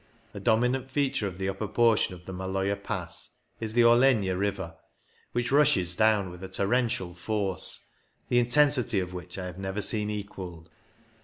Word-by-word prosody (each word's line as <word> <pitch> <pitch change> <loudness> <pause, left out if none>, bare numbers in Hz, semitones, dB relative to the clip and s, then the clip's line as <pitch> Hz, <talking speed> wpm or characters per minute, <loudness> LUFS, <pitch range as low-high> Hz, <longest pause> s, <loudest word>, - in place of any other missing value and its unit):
'' 115 -1 -33
A 100 - -6
dominant 125 +4 +1
feature 135 -6 0
of 90 -2 -7
the 95 0 -2
upper 95 +2 -3
portion 110 -3 +2
of 90 0 -15
the 95 - -7
Maloja 95 +2 -1
Pass 95 -4 -5 0.2
is 110 0 -4
the 120 - +6
Orlegna 115 -5 +4
river, 95 -3 -2 0.6
which 120 0 -1
rushes 135 -12 +3
down 105 -3 +3
with 90 0 -11
a - - -4
torrential 100 -2 0
force, 95 0 -2 0.4
the 120 - +3
intensity 125 -3 +3
of 90 -1 -4
which 90 +1 -7
I 95 - -4
have 90 0 -7
never 95 +1 -3
seen 105 +1 0
equalled. 95 -5 -7
100 Hz, 170 wpm, -28 LUFS, 95-120 Hz, 0.6 s, the